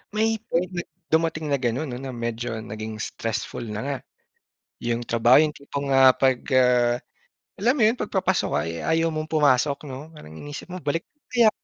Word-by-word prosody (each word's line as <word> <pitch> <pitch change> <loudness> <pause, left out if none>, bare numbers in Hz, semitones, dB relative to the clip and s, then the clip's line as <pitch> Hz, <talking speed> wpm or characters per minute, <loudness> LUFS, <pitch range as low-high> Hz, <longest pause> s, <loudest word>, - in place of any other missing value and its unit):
May 220 0 +2
point 180 -1 0
na 175 -1 -3 0.3
dumating 160 -2 +1
na 140 - +2
ganon 125 +3 -1
ano, 130 +2 -5
medyo 115 0 -3
naging 110 0 -6
stressful 115 +2 -4
na 105 0 -4
nga, 140 -1 -2 0.8
yung 120 0 -1
trabaho. 120 +4 +5
Yung 150 - -1
tipong, 140 0 -5
ah, 130 -1 +8
'pag, 130 -2 +3 0.2
ah, 125 -1 +4 0.6
alam 230 +5 +3
mo - - +3
yun, 225 +3 +4
'pag 210 - -5
papasok 190 -1 +1
ka - - +2
ay - - -3
ayaw 165 +1 +2
mong 155 0 -3
pumasok 145 -1 +2
'no? 140 +5 -8
Parang 80 - -12
iniisip 145 - -8
mo, 180 - -6
"Balik 165 +4 -1
na 295 - -47
kaya 235 -3 +6
140 Hz, 185 wpm, -24 LUFS, 120-165 Hz, 0.8 s, ah